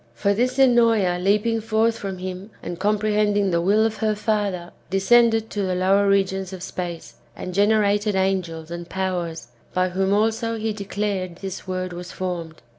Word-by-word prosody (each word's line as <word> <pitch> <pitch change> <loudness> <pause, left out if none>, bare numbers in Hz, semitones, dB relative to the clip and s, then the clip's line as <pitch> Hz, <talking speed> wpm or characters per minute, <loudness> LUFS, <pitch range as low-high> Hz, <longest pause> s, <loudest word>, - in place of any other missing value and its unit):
For 200 +13 +1
this 250 +5 0
Ennoea 230 -8 +4
leaping 210 +4 +1
forth 225 +1 +1
from 195 -2 -4
him, 185 +2 -6
and 175 - -5
comprehending 210 -1 +1
the 170 0 +2
will 205 +5 +3
of 220 -1 -1
her 215 -1 0
father, 205 -5 -1 0.2
descended 225 +3 +3
to 205 - -2
the 185 -2 0
lower 195 +2 +3
regions 195 -1 +1
[of 185 -1 -7
space], 175 -3 -6 0.2
and 185 - -6
gene 200 +3 +3
rated 210 -1 +2
angels 180 -4 -1
and 170 0 -6
powers, 180 -4 -3 0.3
by 185 0 +2
whom 190 +2 0
also 225 +2 +1
he 220 0 -2
declared 200 -3 -3
this 190 +1 -7
world 185 -1 -3
was 175 +1 -7
formed. 170 -4 -5
195 Hz, 170 wpm, -23 LUFS, 185-215 Hz, 0.3 s, Ennoea